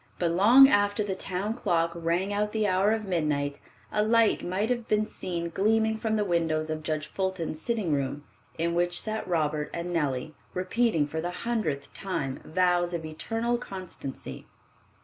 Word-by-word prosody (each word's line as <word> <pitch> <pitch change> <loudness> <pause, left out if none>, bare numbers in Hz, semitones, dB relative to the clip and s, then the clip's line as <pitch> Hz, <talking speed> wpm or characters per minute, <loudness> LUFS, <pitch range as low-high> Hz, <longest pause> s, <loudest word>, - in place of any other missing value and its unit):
But 170 -2 +1
long 230 +10 +8
after 205 -2 +2
the 200 -2 -2
town 190 +3 -2
clock 170 -8 +1
rang 170 +4 -1
out 210 +1 0
the 215 -1 +1
hour 195 +1 +3
of 220 -1 -1
midnight, 150 -6 -1 0.3
a 210 - +2
light 225 0 +3
might 200 +6 -1
have 240 -2 -1
been 215 0 +2
seen 170 -4 -4
gleaming 220 +4 +2
from 220 0 -1
the 210 -1 +1
windows 160 -3 0
of 155 0 -3
Judge 155 0 -2
Fulton's 180 -2 -3
sitting 215 -8 0
room, 140 +1 -2 0.3
in 170 +1 0
which 175 +1 +1
sat 220 0 -3
Robert 155 -3 0
and 175 +1 -3
Nellie, 145 -2 -1 0.2
repeating 185 -3 +1
for 160 +2 -4
the 175 - -2 0.2
hundredth 160 -13 -2
time 150 -9 -3
vows 175 0 +1
of 165 -2 -4
eternal 225 +10 -2
constancy. 185 - -7
180 Hz, 170 wpm, -28 LUFS, 160-215 Hz, 0.3 s, long